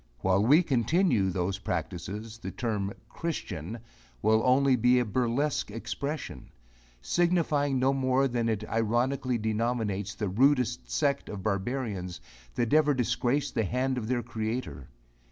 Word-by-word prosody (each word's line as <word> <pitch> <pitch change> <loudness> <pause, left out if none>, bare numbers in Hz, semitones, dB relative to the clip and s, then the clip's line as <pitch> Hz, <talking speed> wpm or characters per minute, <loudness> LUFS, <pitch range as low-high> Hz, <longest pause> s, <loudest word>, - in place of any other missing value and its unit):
While 95 +2 +3
we 150 +10 +6
continue 130 - +2
those 95 +2 -2
practices 95 +6 -4
the - - -5
term 105 -5 -2 0.2
christian 115 - -5 0.5
will 110 +1 +4
only 130 +1 +4
be 125 +1 +4
a 125 - +2
burlesque 125 +7 0
expression, 140 +7 -5 0.5
signifying 150 - +1
no 130 +2 +3
more 135 0 +2
than 120 -2 -1
that 110 -2 -1
it - - -8
ironically 120 +3 0
denominates 110 -2 -1
the 105 - -2
rudest 125 +3 +2
sect 140 -2 0
of 100 -3 -6
barbarians 100 -3 -2 0.4
that 120 +1 0
ever 150 -2 +4
disgraced 130 +3 0
the 115 - +1
hand 130 +5 0
of 110 - -5
their 120 -1 0
Creator. 110 - -4
120 Hz, 135 wpm, -28 LUFS, 105-135 Hz, 0.5 s, we